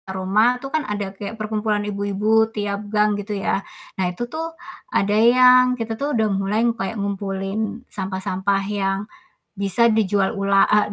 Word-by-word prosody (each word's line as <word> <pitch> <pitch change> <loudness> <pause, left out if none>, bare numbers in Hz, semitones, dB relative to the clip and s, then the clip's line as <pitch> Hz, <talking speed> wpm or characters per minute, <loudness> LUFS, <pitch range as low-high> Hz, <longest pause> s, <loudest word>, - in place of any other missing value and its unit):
Roma 195 +6 +2
itu 275 - -7
kan 315 - +2
ada 205 -2 -3
kayak 205 +3 -7
perkumpulan 215 -1 -1
ibu-ibu 210 +2 +1
tiap 205 -1 -4
gang, 210 0 +2
gitu 205 0 -4
ya, 195 - -1 0.4
nah, 190 - +2
itu 180 +7 -4
tuh 325 +6 -6 0.3
ada 205 - +1
yang 250 +3 +6
kita 225 -1 -3
tuh 290 +1 -1
udah 220 -1 +2
mulai 200 +4 0
kayak 225 0 -4
ngumpulin 200 +3 -3
sampah-sampah 190 0 -2
yang 195 -1 -1 0.6
bisa 200 +4 +3
dijual 205 -2 +1
ula 195 0 +3
e 210 - +4
210 Hz, 155 wpm, -21 LUFS, 195-225 Hz, 0.6 s, yang